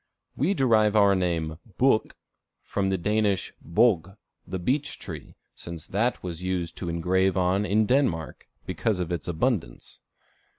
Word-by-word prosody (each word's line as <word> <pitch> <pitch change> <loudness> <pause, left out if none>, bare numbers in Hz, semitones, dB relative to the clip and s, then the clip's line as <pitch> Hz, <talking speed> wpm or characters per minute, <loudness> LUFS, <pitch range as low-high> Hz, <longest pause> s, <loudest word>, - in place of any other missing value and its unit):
We 170 +10 +1
derive 110 - +3
our 100 -2 +6
name 85 -4 -1 0.2
book 130 -4 +2 0.5
from 95 -1 -1
the 95 - +1
Danish 105 +1 0
bog, 95 +1 +2 0.3
the 95 - -3
beech 135 +11 -1
tree, - - -9 0.2
since 85 -2 -8
that 115 +6 -1
was 85 -2 -5
used 90 -2 -2
to 90 - -4
engrave 95 +3 +1
on 95 +3 +2
in 105 +2 +3
Denmark, 100 - 0 0.2
because 105 -5 -1
of 90 -1 -3
its 85 -2 -3
abundance. 85 - -2
95 Hz, 140 wpm, -26 LUFS, 85-110 Hz, 0.5 s, our